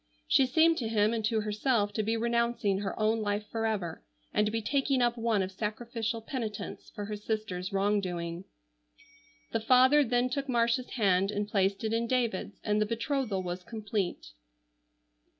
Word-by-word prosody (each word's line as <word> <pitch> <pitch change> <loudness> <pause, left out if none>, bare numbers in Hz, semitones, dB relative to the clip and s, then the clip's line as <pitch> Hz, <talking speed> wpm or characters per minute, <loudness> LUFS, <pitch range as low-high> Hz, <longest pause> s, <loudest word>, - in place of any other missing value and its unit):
She 265 - +4
seemed 320 +5 +4
to 230 - -2
him 215 0 +2
and 225 -1 -1
to 220 0 +1
herself 210 0 0
to 215 - 0
be 225 +2 0
renouncing 235 -3 +1
her 200 +1 -4
own 220 +1 +2
life 205 0 -1
forever, 215 -7 -2 0.3
and 210 - +3
to - - -1
be 225 - 0
taking 270 +3 +1
up 240 -1 +2
one 225 -4 +1
of 185 - -4
sacrificial 225 +3 -3
penitence 225 -5 -5
for 205 - -4
her 210 +1 -4
sister's 210 -4 -3
wrong 200 +1 +2
doing. 175 -1 -4 1.1
The 225 - 0
father 260 +5 +5
then 245 0 +1
took 275 +1 -2
Marcia's 235 +1 +1
hand 195 -5 +2
and 205 0 -2
placed 195 0 +1
it 220 0 -1
in 230 +1 0
David's, 230 -5 -1
and 210 0 +1
the 215 - +2
betrothal 230 -3 -1
was 180 0 -4
complete. 210 -3 -3
220 Hz, 170 wpm, -30 LUFS, 205-235 Hz, 1.1 s, father